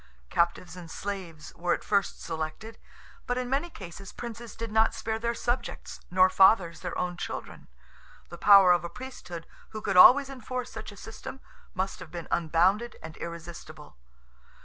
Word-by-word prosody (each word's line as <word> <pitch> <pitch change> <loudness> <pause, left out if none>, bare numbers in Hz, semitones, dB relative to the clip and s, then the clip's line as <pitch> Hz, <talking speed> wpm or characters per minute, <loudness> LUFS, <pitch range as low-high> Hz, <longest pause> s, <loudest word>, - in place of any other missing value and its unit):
Captives 170 0 0
and 175 -2 -10
slaves 180 -5 -6
were 175 0 +1
at - - -10
first 200 -3 0
selected; 160 +8 -5 0.5
but, 245 - 0
in 250 0 -3
many 285 +6 0
cases, 190 - -10
princes 235 -1 -8
did 225 -1 -5
not 220 +1 +3
spare 220 0 -3
their 235 +1 -1
subjects, 240 +1 -3
nor 185 +1 +5
fathers 185 -3 +4
their 180 - -5
own 180 -1 -2
children. - - -6 0.6
The 170 - -10
power 195 -3 +8
of 175 -2 +3
a 170 - -4
Priesthood, 180 -10 -8 0.2
who 215 - -7
could - - 0
always 270 +9 +9
enforce 255 -1 -5
such 220 -1 -8
a 205 - -14
system, 225 +6 -9 0.4
must 190 +1 -2
have - - -10
been 170 -2 -7
unbounded 180 +8 +2
and 160 -1 -8
irresistible. 165 - -9
195 Hz, 165 wpm, -28 LUFS, 170-230 Hz, 0.6 s, always